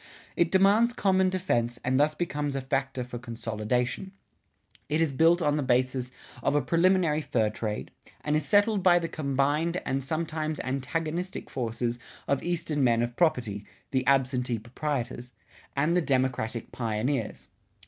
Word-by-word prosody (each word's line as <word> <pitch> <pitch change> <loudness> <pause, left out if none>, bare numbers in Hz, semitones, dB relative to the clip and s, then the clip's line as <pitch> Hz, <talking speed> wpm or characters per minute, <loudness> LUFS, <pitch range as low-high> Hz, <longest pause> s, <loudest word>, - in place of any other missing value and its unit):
It 170 -1 +2
demands 205 +5 +4
common 190 -4 +2
defense 120 -11 0
and 130 +1 +2
thus 150 +1 +3
becomes 145 -4 -2
a 135 - -1
factor 130 -1 -1
for 125 -1 -7
consolidation. 120 - -2 0.8
It 155 - +1
is 160 -4 +1
built 165 +5 +4
on 145 0 +2
the - - 0
basis 130 0 0 0.3
of - - +1
a 145 - +4
preliminary 170 +1 +3
fur 110 -7 0
trade, 110 -1 -4 0.3
and 150 0 0
is 155 - +1
settled 205 +6 +3
by 180 -1 +6
the 170 -1 -1
combined 150 +4 0
and 135 +1 -1
sometimes 155 +1 -2
antagonistic 155 +7 -3
forces 120 -1 -2 0.3
of 140 -1 +1
eastern 160 -4 -1
men 120 -2 +3
of 120 0 -3
property 120 - +1 0.3
(the 130 -1 +1
absentee 130 -3 +2
proprietors) 125 +1 -4 0.4
and 150 +5 +2
the 180 - +3
democratic 130 -5 -1
pioneers. 115 +1 -2
140 Hz, 150 wpm, -28 LUFS, 125-165 Hz, 0.8 s, by